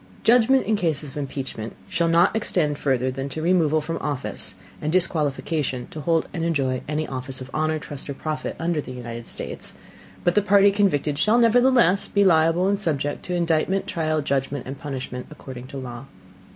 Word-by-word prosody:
Judgment 245 +3 +5
in 220 - +2
cases 155 -7 -1
of - - -10
Impeachment 135 -5 -5
shall 170 - 0
not 170 +5 +4
extend 155 -9 +1
further 130 -2 +1
than 135 +2 -4
to 155 - -5
removal 160 -2 +3
from 165 +2 -4
Office, 145 -3 -3 0.3
and 150 - -1
disqualification 150 -6 0
to 155 - -6
hold 165 +2 +1
and 165 - -2
enjoy 135 -6 0
any 155 +1 -1
Office 130 0 -5
of 130 +1 -9
honor, 155 0 +1
Trust 150 -3 -7
or 140 - -3
Profit 155 +2 -4
under 165 -2 0
the 130 - -8
United 120 -1 -7
States: - - -6 0.5
but 175 - +3
the 210 - +4
Party 200 0 +5
convicted 150 -8 +1
shall 215 +8 +4
nevertheless 240 -4 +4
be 200 - +2
liable 165 +1 +4
and 200 0 +1
subject 145 -7 -1
to 180 - -2
Indictment, 170 +3 +1
Trial, 155 -3 -1
Judgment 140 -1 -1
and 135 +1 -7
Punishment, 130 -3 -5
according 130 -4 -9
to 140 - -8
Law. 125 -1 -7
155 Hz, 180 wpm, -24 LUFS, 135-180 Hz, 0.5 s, Judgment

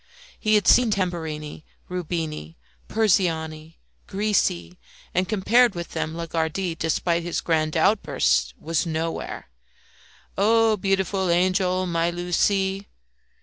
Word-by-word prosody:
He 215 0 +2
had 205 -3 +2
seen 245 -1 +6
Tambourini, 160 -7 -3 0.2
Rubini, 160 - -4 0.3
Persiani, 165 -7 0 0.3
Grisi, 190 - -1 0.3
and, 185 +1 0
compared 225 +2 +3
with 170 0 -5
them, 160 +1 -4
Lagardy, 165 +2 -2
despite 165 +1 0
his 170 0 -2
grand 155 -1 0
outbursts, 140 - +2
was 165 +2 -1
nowhere. 160 - -4 0.9
Oh 225 +1 +4
beautiful 195 -1 0
angel, 185 +1 +2
my 170 -1 0
Lucie. 190 +3 0
175 Hz, 105 wpm, -24 LUFS, 160-195 Hz, 0.9 s, seen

